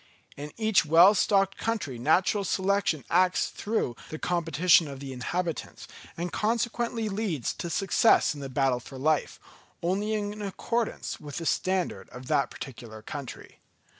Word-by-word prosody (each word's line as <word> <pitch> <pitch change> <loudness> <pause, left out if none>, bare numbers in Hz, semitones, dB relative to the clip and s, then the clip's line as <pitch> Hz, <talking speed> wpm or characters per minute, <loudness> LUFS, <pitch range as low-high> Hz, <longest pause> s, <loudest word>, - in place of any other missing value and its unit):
In 145 +1 -7
each 220 -5 +3
well 165 +6 +7
stocked 195 -2 +2
country 185 - -2
natural 180 - +2
selection 190 -5 0
acts 180 +1 +3
through 205 - -2
the 155 - -5
competition 170 0 +3
of 140 -1 -8
the 135 -1 -7
inhabitants 165 +7 -4 0.3
and 175 +1 -4
consequently 230 +1 -1
leads 195 - -2
to 170 - -3
success 195 +3 +3
in 145 - -9
the 135 - -5
battle 130 -1 +1
for 130 +2 -11
life, 155 +3 0 0.4
only 200 +5 0
in 210 0 -4
accordance 225 +3 -3
with 145 -2 -8
the 165 - -4
standard 185 +2 -1
of 125 +1 -10
that 145 -3 +2
particular 115 -4 -9
country. 140 +2 -8
175 Hz, 145 wpm, -27 LUFS, 145-205 Hz, 0.4 s, well